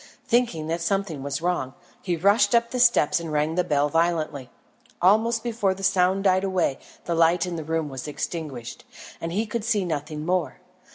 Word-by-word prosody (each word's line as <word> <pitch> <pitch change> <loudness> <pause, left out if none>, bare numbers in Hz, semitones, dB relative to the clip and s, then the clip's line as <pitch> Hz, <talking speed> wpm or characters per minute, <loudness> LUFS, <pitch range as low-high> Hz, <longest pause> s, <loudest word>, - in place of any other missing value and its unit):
Thinking 230 -10 +1
that 165 +2 -2
something 185 -4 -1
was 140 +3 -4
wrong, 170 -7 -1 0.3
he 180 -3 -1
rushed 200 +8 +3
up 235 0 +2
the 250 - -2
steps 235 -11 +4
and 165 -2 -6
rang 150 +1 0
the 180 +1 +1
bell 145 -3 +1
violently. 155 -4 -1 0.5
Almost 220 +5 +3
before 220 -5 0
the 195 - -10
sound 190 0 +2
died 190 -1 +3
away 185 -8 0 0.3
the 170 - -1
light 165 +1 +3
in 180 -1 -4
the 160 - -4
room 160 0 -2
was 135 0 -7
extinguished, 150 -5 -5 0.4
and 165 - -3
he 210 +6 0
could 225 0 -4
see 210 -4 +1
nothing 150 -1 -4
more. 180 0 -1
175 Hz, 185 wpm, -24 LUFS, 155-195 Hz, 0.5 s, steps